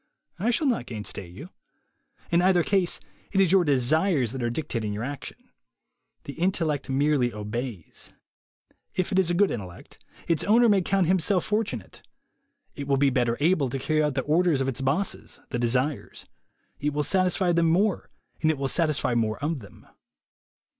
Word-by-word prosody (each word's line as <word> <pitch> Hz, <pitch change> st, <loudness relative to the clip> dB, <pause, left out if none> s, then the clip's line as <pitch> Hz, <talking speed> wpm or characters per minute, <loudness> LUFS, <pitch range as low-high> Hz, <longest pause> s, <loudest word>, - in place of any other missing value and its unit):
I 215 Hz, +6 st, 0 dB
shall 245 Hz, +6 st, +1 dB
not 235 Hz, -, 0 dB
gainsay 105 Hz, -4 st, -5 dB
you. 145 Hz, -, -11 dB, 0.8 s
In 170 Hz, +1 st, +4 dB
either 180 Hz, -1 st, +3 dB
case, 190 Hz, -2 st, +1 dB, 0.3 s
it 195 Hz, -, +1 dB
is 190 Hz, -3 st, +4 dB
your 190 Hz, -2 st, +5 dB
desires 145 Hz, -, +2 dB
that 130 Hz, 0 st, -5 dB
are 120 Hz, -, 0 dB
dictating 115 Hz, -6 st, -3 dB
your 105 Hz, +2 st, -4 dB
action. 140 Hz, +2 st, -6 dB, 0.9 s
The 140 Hz, -, -7 dB
intellect 165 Hz, -5 st, -1 dB
merely 135 Hz, -2 st, +2 dB
obeys. 105 Hz, -2 st, -6 dB, 0.8 s
If 185 Hz, +2 st, -1 dB
it 190 Hz, -, +2 dB
is 185 Hz, -3 st, +2 dB
a 175 Hz, -, +1 dB
good 200 Hz, +2 st, +3 dB
intellect, 95 Hz, -6 st, -8 dB, 0.2 s
its 165 Hz, -3 st, +1 dB
owner 235 Hz, +3 st, +5 dB
may 200 Hz, -3 st, +4 dB
count 190 Hz, +1 st, +1 dB
himself 185 Hz, +1 st, +2 dB
for 215 Hz, +2 st, +1 dB
tunate. 210 Hz, -, -8 dB, 0.7 s
It 140 Hz, -1 st, -7 dB
will 140 Hz, -1 st, +2 dB
better 125 Hz, -4 st, +2 dB
able 150 Hz, -3 st, +2 dB
to 135 Hz, -, -3 dB
carry 155 Hz, +3 st, 0 dB
out 150 Hz, -3 st, 0 dB
the 130 Hz, -, +1 dB
orders 160 Hz, +1 st, +2 dB
of 135 Hz, -, -1 dB
its 135 Hz, -1 st, -3 dB
bo 135 Hz, +9 st, +1 dB, 0.5 s
the 120 Hz, -, -3 dB
desires; 125 Hz, +4 st, -1 dB, 0.5 s
it 150 Hz, +1 st, -1 dB
will 150 Hz, 0 st, 0 dB
satisfy 185 Hz, +1 st, +1 dB
them 170 Hz, -1 st, +2 dB
more, 190 Hz, +3 st, +1 dB, 0.3 s
and 160 Hz, 0 st, +3 dB
> -, -, -8 dB
will 135 Hz, 0 st, -1 dB
satisfy 155 Hz, -6 st, +1 dB
more 110 Hz, -2 st, 0 dB
of 150 Hz, 0 st, -2 dB
them. 100 Hz, -, -15 dB
150 Hz, 175 wpm, -26 LUFS, 125-180 Hz, 0.9 s, your